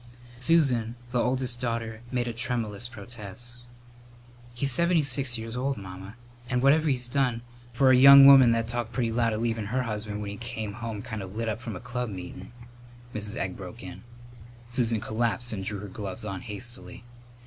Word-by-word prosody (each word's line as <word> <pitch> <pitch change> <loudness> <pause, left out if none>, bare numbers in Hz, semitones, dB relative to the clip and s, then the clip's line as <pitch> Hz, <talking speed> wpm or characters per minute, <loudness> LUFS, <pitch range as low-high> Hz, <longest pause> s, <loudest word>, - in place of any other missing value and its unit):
Susan, 125 -6 +3 0.2
the 125 -2 +1
oldest 125 -1 -1
daughter, 115 -2 -3
made 125 -1 -1
a 120 - -3
tremulous 115 -1 -2
protest. 120 +1 -8 0.9
"He's 135 +3 0
seventy 170 +3 +3
six 135 -2 0
years 115 +1 -6
old, 135 +1 -1
Mamma, 95 +2 -9 0.3
and 125 -1 0
whatever 155 +3 +4
he's 125 -3 -1
done 125 -3 0
" 120 -1 -23
"For 130 +2 +4
a - - +7
young 140 +2 +10
woman 135 -3 +9
that 115 0 0
talked 120 0 -3
pretty 115 -2 0
loud 115 0 +1
of 110 +1 -2
leavin' 115 -3 -1
her 125 +4 0
husband 105 -2 -4
when 100 - -5
he 100 - -7
came 110 -3 -5
home 110 -1 -6
kind 110 -4 -5
of 95 +1 -8
lit 115 +1 -2
up 110 +1 -4
from 115 -4 -6
a - - -6
club 125 0 -4
meetin' 95 0 -8 0.3
" 120 0 -20
Mrs. 105 +1 -3
Egg 95 -6 -3
broke 95 +4 -9
in. 90 0 -9 0.7
Susan 120 -2 +1
collapsed 115 +2 -1
and 95 -2 -4
drew 105 +2 -3
her 105 - -7
gloves 100 +2 -7
on 95 -3 -5
hastily. 120 +4 -7
120 Hz, 190 wpm, -27 LUFS, 105-125 Hz, 0.9 s, young